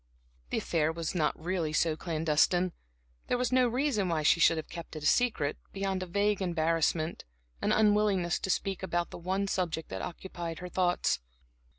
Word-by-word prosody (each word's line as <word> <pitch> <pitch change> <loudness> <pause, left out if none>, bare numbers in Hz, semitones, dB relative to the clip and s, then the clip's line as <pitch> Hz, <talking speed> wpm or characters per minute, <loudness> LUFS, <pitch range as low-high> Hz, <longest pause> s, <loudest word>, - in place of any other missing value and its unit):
The - - -1
affair 160 -1 +1
was 165 0 -3
not 155 -4 0
really 170 -1 -1
so 160 0 +2
clandestine. 165 +2 +1 0.6
There 245 - +1
was 250 0 0
no 255 -1 +4
reason 240 -6 0
why 160 -2 0
she 160 - +4
should 165 0 +5
have 160 - -4
kept 170 -1 -8
it 155 - -6
secret 155 -5 +2 0.2
beyond 195 -1 -2
a 185 - -4
vague 200 +2 +1
embarrassment, 165 -2 0 0.4
an - - +1
unwillingness 205 -4 +3
to - - -4
speak 190 +1 -1
about 175 -2 -1
the - - -8
one 190 +3 -1
subject 170 -4 -2
that 95 0 -4
occupied 170 -2 -6
her 180 0 -7
thoughts. 180 0 +1
175 Hz, 175 wpm, -30 LUFS, 160-195 Hz, 0.6 s, should